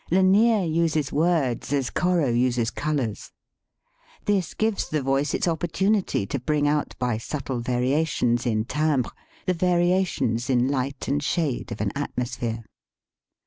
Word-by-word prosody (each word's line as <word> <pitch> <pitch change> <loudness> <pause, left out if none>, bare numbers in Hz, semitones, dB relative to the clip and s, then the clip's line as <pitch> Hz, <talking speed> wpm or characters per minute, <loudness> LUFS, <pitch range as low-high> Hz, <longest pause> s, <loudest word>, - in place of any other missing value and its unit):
Lanier 195 +4 +4
uses 160 -3 0
words 150 -6 +1
as 135 -3 0
Corot 175 -8 +1
uses 120 -1 +1
colors. 135 -9 -2 0.9
This 200 -4 0
gives 220 -2 0
the 150 -2 -1
voice 135 +3 +1
its - - 0
opporttmity 175 - 0
to 140 - -2
bring 145 +3 +1
out 150 0 0
by 120 -3 -1
subtle 135 0 -4
variations 125 0 +1
in 110 -1 0
timbre 150 -2 0 0.3
the 185 - +2
variations 175 -9 +1
in 125 -1 +3
light 135 0 -2
and 145 +2 0
shade 145 -2 -1
of - - -4
an - - 0
atmosphere. 120 -2 -3
145 Hz, 135 wpm, -25 LUFS, 125-170 Hz, 0.9 s, Lanier